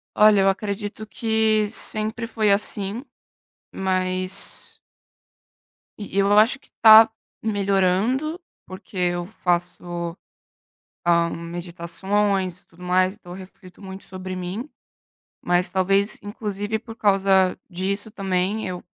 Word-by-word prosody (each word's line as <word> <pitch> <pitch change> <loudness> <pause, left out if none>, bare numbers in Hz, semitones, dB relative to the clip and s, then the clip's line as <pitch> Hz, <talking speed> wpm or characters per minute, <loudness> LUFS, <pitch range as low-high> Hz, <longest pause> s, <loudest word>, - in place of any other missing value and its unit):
Olha, 210 -2 +6
eu 195 - +4
acredito 205 +2 -4
que 220 -1 +1
sempre 220 +2 -1
foi 215 -3 +1
assim, 205 +3 -1 0.7
mas 185 0 0 1.2
E 200 - -8
e - - +3
eu 200 +1 +3
acho 240 +5 +3
que - - -26
tá 220 0 +9 0.3
melhorando, 205 - 0 0.2
porque 190 +1 -12
eu 175 -1 0
faço, 175 -2 -3 0.9
hã, 170 -1 +3
meditações 180 +3 -2
e - - -31
tudo 175 +1 -20
mais. 185 +1 +2
Então 180 -4 -12
eu - - -8
reflito 185 0 -14
muito 190 0 -9
sobre 185 0 -7
mim, 185 +9 -5 0.7
mas 175 +1 +1
talvez, 195 +2 +1
inclusive 205 0 -4
por 225 -1 -11
causa 195 -2 +3
disso 200 +4 -3
também, 195 +1 -1
eu 180 -1 -5
195 Hz, 115 wpm, -23 LUFS, 185-215 Hz, 1.2 s, tá